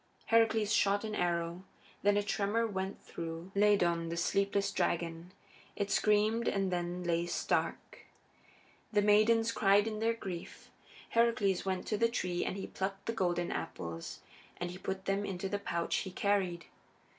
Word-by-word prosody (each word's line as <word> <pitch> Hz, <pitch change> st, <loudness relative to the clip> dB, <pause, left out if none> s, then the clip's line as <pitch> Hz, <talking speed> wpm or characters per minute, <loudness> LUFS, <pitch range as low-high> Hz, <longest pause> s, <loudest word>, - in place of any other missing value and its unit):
Heracles 225 Hz, -2 st, +3 dB
shot 200 Hz, +1 st, +3 dB
an 215 Hz, -1 st, -4 dB
arrow; 170 Hz, -1 st, -1 dB, 0.4 s
then 205 Hz, 0 st, +3 dB
a 205 Hz, -, +2 dB
tremor 205 Hz, +3 st, 0 dB
went 190 Hz, -2 st, -3 dB
through 165 Hz, +2 st, -6 dB
Ladon, 175 Hz, -5 st, +3 dB
the 170 Hz, -, -3 dB
sleepless 200 Hz, +2 st, +1 dB
dragon; 170 Hz, +1 st, -1 dB, 0.4 s
it 200 Hz, -1 st, -2 dB
screamed 215 Hz, +3 st, +2 dB
and 195 Hz, -2 st, 0 dB
then 175 Hz, 0 st, -2 dB
lay 170 Hz, 0 st, 0 dB
stark. -, -, -1 dB, 0.9 s
The 205 Hz, -2 st, +3 dB
maidens 225 Hz, +2 st, +4 dB
cried 200 Hz, 0 st, +4 dB
in 215 Hz, -1 st, -3 dB
their 230 Hz, +1 st, +1 dB
grief; 185 Hz, -6 st, -8 dB, 0.4 s
Heracles 230 Hz, -6 st, +2 dB
went 190 Hz, -1 st, -1 dB
to 210 Hz, -, -1 dB
the 230 Hz, 0 st, +4 dB
tree, 180 Hz, -7 st, -1 dB
and 190 Hz, -, -3 dB
he 195 Hz, -, -4 dB
plucked 195 Hz, +1 st, -4 dB
the 230 Hz, -, -1 dB
golden 175 Hz, -4 st, 0 dB
apples 85 Hz, -1 st, -5 dB, 0.4 s
and 175 Hz, 0 st, -3 dB
he 180 Hz, -, -9 dB
put 190 Hz, 0 st, -4 dB
them 195 Hz, +1 st, 0 dB
into 195 Hz, -1 st, -3 dB
the 200 Hz, +1 st, -2 dB
pouch 170 Hz, -4 st, -1 dB
he 190 Hz, -, -3 dB
carried. 185 Hz, -3 st, 0 dB
195 Hz, 155 wpm, -33 LUFS, 175-210 Hz, 0.9 s, maidens